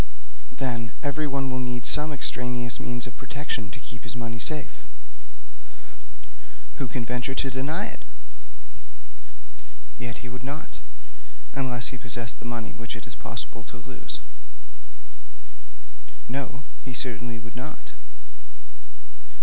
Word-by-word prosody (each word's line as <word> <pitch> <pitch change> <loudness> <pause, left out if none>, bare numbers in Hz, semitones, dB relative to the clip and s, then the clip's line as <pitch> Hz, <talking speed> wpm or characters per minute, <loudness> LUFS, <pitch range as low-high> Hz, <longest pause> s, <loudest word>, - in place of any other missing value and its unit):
'Then, 120 -3 +1
everyone 140 -2 +3
will 130 - +2
need 125 -1 +1
some 150 +1 +5
extraneous 125 -3 +2
means 120 0 0
of 120 - -6
protection 130 -5 0
to 110 - -5
keep 120 +1 -7
his 120 - -1
money 115 -1 -1
safe.' 150 +3 +2 2.0
'Who 135 - +1
can 115 +1 0
venture 125 +3 +1
to 135 - +3
deny 135 +5 +2
it?' - - -6 2.0
'Yet 120 +1 -2
he - - -3
would 125 0 -4
not, 140 +4 -4 0.7
unless 125 -3 +3
he 125 - -4
possessed 120 -1 +2
the 120 - -3
money 115 -2 -1
which 115 +1 -3
it 115 - -5
is 120 - -5
possible 115 0 -1
to 120 - -7
lose.' 120 - -1 2.1
'No; 135 +2 -1 0.2
he 130 -2 -3
certainly 120 -1 0
would 115 +1 -7
not.' 130 +5 -5
125 Hz, 125 wpm, -30 LUFS, 115-135 Hz, 2.1 s, some